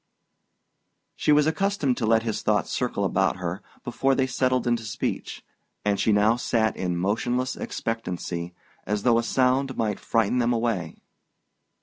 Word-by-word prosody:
She - - +1
was 150 0 +5
accustomed 160 -5 +1
to 115 - -1
let 110 0 +4
his 115 -2 -2
thoughts 105 -1 +1
circle 120 -5 -1
about 95 -1 +1
her 90 +2 -4 0.2
before 135 +3 +1
they 130 - +2
settled 130 -1 0
into 120 -1 +1
speech, 110 -1 -4 0.4
and 100 -1 +1
she 110 - +2
now 105 +3 +4
sat 110 -2 +1
in 90 -2 -2
motionless 120 +7 0
expectancy, 90 -6 -4 0.3
as 105 -1 -1
though 120 -2 +4
a - - -1
sound 130 +2 +1
might 105 -3 -1
frighten 115 +2 +1
them 120 0 +2
away. 115 -8 -2
115 Hz, 150 wpm, -25 LUFS, 105-125 Hz, 0.4 s, was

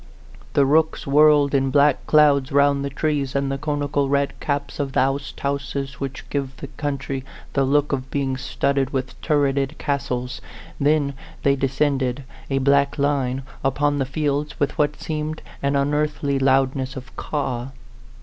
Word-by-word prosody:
The 140 - +4
rooks 160 +3 +2
whirled 145 0 +5
in 135 -1 +2
black 140 0 +3
clouds 145 -2 +4
round 140 0 +3
the 140 - -2
trees 140 -1 -1
and 140 0 0
the 135 - -3
coni 145 -1 -1
cal 140 -1 0
red 140 0 +1
caps 145 0 -3
of 140 -2 -2
the - - +2
oasthonses 140 0 -2
which 135 -1 -5
give 135 -2 -3
that 140 - -9
county 140 -2 -3 0.3
the 140 - +2
look 145 +2 +2
of 130 -1 -2
being 135 -2 -1
studded 135 +1 0
with 130 -2 -3
turreted 140 -1 +1
castles; 130 -4 -2 0.4
then 145 -1 +2 0.3
they 140 0 +4
descended 135 -1 0 0.3
a 135 - +1
black 140 +1 +3
line 135 -2 0 0.2
upon 145 +2 +1
the 135 - 0
fields, 145 +1 -2
with 145 - 0
what 150 0 0
seemed 155 -1 -4 0.2
an 140 0 +1
unearthly 145 0 0
loudness 135 0 +2
of 130 0 -9
caw. 130 -5 -3
140 Hz, 155 wpm, -22 LUFS, 135-145 Hz, 0.4 s, whirled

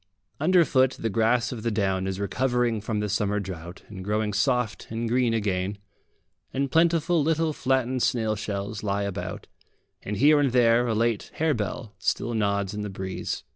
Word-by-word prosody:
Underfoot 150 -6 +4
the 115 - -3
grass 115 +3 +2
of 120 -4 -5
the 115 - 0
down 95 -3 0
is 95 0 -3
recovering 120 +2 0
from 105 0 -2
the 105 - -1
summer 105 0 0
drought 90 -2 -7
and 95 -3 -8
growing 105 +1 -1
soft 125 +1 0
and 115 +1 -3
green 120 0 +2
again, 100 -3 -1 0.7
and 135 0 -1
plentiful 165 0 +3
little 160 +1 +1
flattened 130 -2 0
snail 110 -3 +1
shells 100 0 -4
lie 100 -1 -1
about, 100 0 -5 0.6
and 105 0 -4
here 150 +5 +5
and 140 -4 +1
there 120 -1 +4
a 115 - 0
late 115 -1 0
harebell 115 -8 -1
still 120 +1 -1
nods 100 -2 0
in 105 - -4
the 105 - -4
breeze. 95 -1 -4
110 Hz, 170 wpm, -26 LUFS, 100-130 Hz, 0.7 s, here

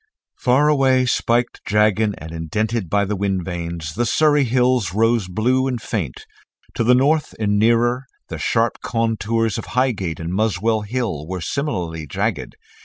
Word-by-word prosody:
Far 130 +4 +3
away, 135 -3 +3
spiked, 120 0 0
jagged 105 0 +2
and 80 +1 -9
indented 95 +5 -2
by 100 +2 +2
the 105 +2 -2
wind 95 -2 -1
vanes, 85 -3 -5
the 120 +7 -1
Surrey 150 -1 +3
Hills 125 -6 +1
rose 115 -2 +2
blue 125 +8 +1
and 125 -2 -2
faint; 90 - -4 0.5
to - - -1
the 125 +2 +5
north 150 +4 +1
and 105 -1 +1
nearer, 120 +3 +2 0.2
the - - -6
sharp - - 0
contours 115 -1 0
of - - -7
Highgate 100 -11 0
and 85 +1 -4
Muswell 110 +2 +1
Hill 105 - -3
were 95 +1 -4
similarly 85 - -3
jagged. - - -3
110 Hz, 155 wpm, -20 LUFS, 95-125 Hz, 0.5 s, the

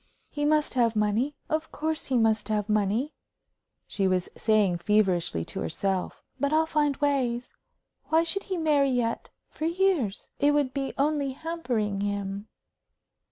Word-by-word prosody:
"He 290 -1 -2
must 305 0 +2
have 235 -3 +2
money 215 +7 +1
of 315 -1 -2
course 315 +1 -2
he 260 - +1
must 220 -2 +2
have 210 -1 0
money," 215 +6 0 0.7
she 195 -2 0
was 185 -1 0
saying, 210 -5 +2
feverishly, 180 - +1
to - - -6
herself. 185 - -2 0.2
"But 280 +2 +1
I'll 315 +1 +3
find 295 -3 +1
ways. 255 -4 0 0.5
Why 320 +1 +3
should 395 +4 -1
he 375 -2 -3
marry 295 -4 +3
yet 240 -3 -1 0.2
for 310 - -5
years? 335 - 0
It 290 +1 +4
would 280 -3 +1
be 275 -1 -3
only 280 -1 +1
hampering 250 -11 -2
him." 200 0 -3
255 Hz, 150 wpm, -27 LUFS, 210-300 Hz, 0.7 s, It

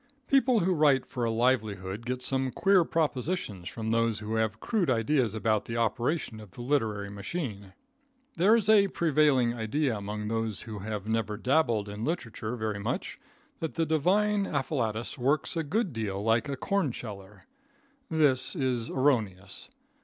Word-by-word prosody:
People 260 -4 +4
who 185 +2 +2
write 145 -5 +3
for 125 -3 -3
a - - +1
livelihood 110 -3 0
get 125 0 -3
some 130 0 0
queer 195 +6 +4
propositions 145 - -2
from 110 -1 -4
those 115 -1 +2
who 105 +1 -5
have 110 -1 0
crude 200 - 0
ideas 120 -1 +1
about 110 -1 +1
the 115 - -4
operation 115 +2 -1
of 105 -2 -11
the 120 - -10
literary 110 -7 0
machine. 100 - -5 0.6
There 195 +6 +5
is 220 -3 +1
a 210 -2 +6
prevailing 150 -8 +2
idea 120 +3 -1
among 105 +1 -4
those 115 -1 -2
who 110 -3 -7
have 105 0 -4
never 110 -2 -1
dabbled 120 -4 +1
in 105 +2 -6
literature 120 -6 -3
very 110 -3 -3
much, 100 - -3 0.4
that 160 - -4
the 165 -1 +1
divine 195 +6 +2
afflatus 125 -6 -2
works 140 +7 +1
a 165 - +1
good 180 - -1
deal 105 -3 -3
like 115 +4 +2
a 140 - -3
corn 195 -1 0
sheller. 105 -4 -9 0.7
This 145 -3 +2
is 125 -6 -1
erroneous. 110 - 0
120 Hz, 160 wpm, -29 LUFS, 110-155 Hz, 0.7 s, a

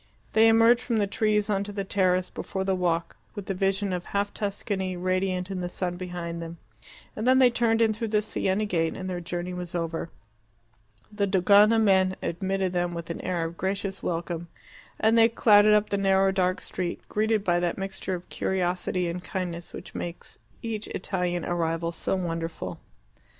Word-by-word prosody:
They 220 +1 +6
emerged 230 +2 +5
from 235 -2 -1
the 205 - +2
trees 210 +1 +1
on 200 -2 0
to 205 - -7
the 200 -1 -3
terrace 185 -2 +1
before 190 - -4
the 190 0 +1
walk, 175 -2 -1 0.2
with 205 - -6
the 195 - -2
vision 195 +1 0
of 180 -1 -3
half 200 0 -1
Tuscany 195 -2 -3
radiant 185 +1 -1
in 185 -1 -3
the 175 - -3
sun 180 0 -3
behind 175 -2 -5
them, 165 0 -7 0.6
and 220 +3 -2
then 260 0 +6
they 255 -2 +6
turned 230 -1 +2
in 220 -1 +3
through 225 +1 -3
the 210 -1 +1
Siena 205 0 0
gate, 165 -5 0
and 185 - -5
their 180 -1 -3
journey 175 +1 -4
was 180 -1 -5
over. 165 -1 -2 1.0
The 205 -1 0
Dogana 205 +3 +5
men 190 -3 +3
admitted 190 +1 -1
them 175 -1 -1
with 170 0 -5
an - - -5
air 180 -2 -1
of 165 +1 -6
gracious 195 0 -2
welcome, 170 0 -3 0.5
and 220 +1 +4
they 230 0 +6
clattered 210 -2 +6
up 210 0 +1
the 200 - +1
narrow 195 0 +3
dark 185 0 0
street, 180 -2 -4
greeted 215 0 +1
by 175 -3 +2
that 175 -1 -1
mixture 195 -1 -3
of 175 0 -9
curiosity 180 -1 -1
and 175 +1 -4
kindness 175 -3 -4
which - - -9
makes 175 0 -7 0.2
each 220 -2 -3
Italian 180 -2 -2
arrival 165 -1 -1
so 170 - -1
wonderful. 165 -2 -4
190 Hz, 185 wpm, -26 LUFS, 175-205 Hz, 1.0 s, They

